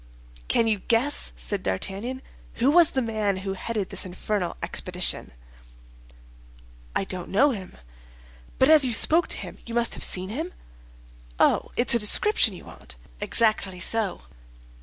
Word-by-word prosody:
"Can 230 - +2
you 215 -2 0
guess," 240 +8 +1
said 205 -2 -4
D'Artagnan, 200 - -3 0.3
"who 255 +4 +2
was 340 0 +6
the 265 - -1
man 215 -4 -1
who 195 - -2
headed 205 0 -4
this - - -1
infernal 185 0 -4
expedition?" 180 +1 0 1.6
"I - - +1
don't 185 -2 -5
know 275 +9 +3
him." 195 -6 -8 0.8
"But 260 +4 +4
as 310 -2 +7
you 250 -2 +1
spoke 325 +9 +4
to - - -1
him - - -9
you 235 - -6
must 235 -1 +2
have - - -4
seen 185 +1 0
him." 320 - -5 0.9
"Oh, - - +2
it's 240 +1 +2
a 235 - +4
description 225 - +4
you - - -13
want?" - - -11 0.2
"Exactly 215 -5 0
so." 210 - -1
220 Hz, 150 wpm, -24 LUFS, 190-255 Hz, 1.6 s, as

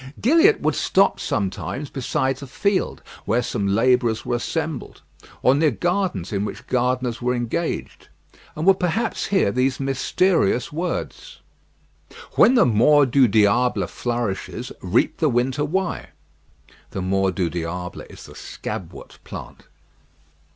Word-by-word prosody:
Gilliatt 330 - +4
would - - +1
stop 195 +1 +2
sometimes 105 +8 -3
beside 130 0 -1
a 140 - -8
field 200 +9 -1 0.2
where 120 +4 +1
some 100 -2 -2
labourers 115 +2 +2
were 120 - 0
assembled, 160 +3 -4 0.4
or 130 - +5
near 150 +2 +3
gardens 175 - -1
in 100 0 0
which 105 - -6
gardeners 125 -1 -1
were 125 +1 0
engaged, 120 +8 -3 0.5
and 155 - -3
would 195 0 +5
perhaps 180 +6 -1
hear 190 - +2
these 130 +3 0
mysterious 135 - +1
words: 175 +4 -5 0.9
"When 255 - +5
the 240 - +5
mors 130 +5 +4
du 135 -1 +5
diable 105 0 +2
flourishes, 120 0 -4
reap 95 +6 +1
the 155 - +2
winter 130 +4 0
rye." 185 +3 -2 0.8
(The 95 - -5
mors 95 0 +1
du 85 -3 -1
diable 90 +1 -5
is - - -12
the - - -13
scabwort - - -8
plant.) - - -10
125 Hz, 130 wpm, -22 LUFS, 105-160 Hz, 0.9 s, or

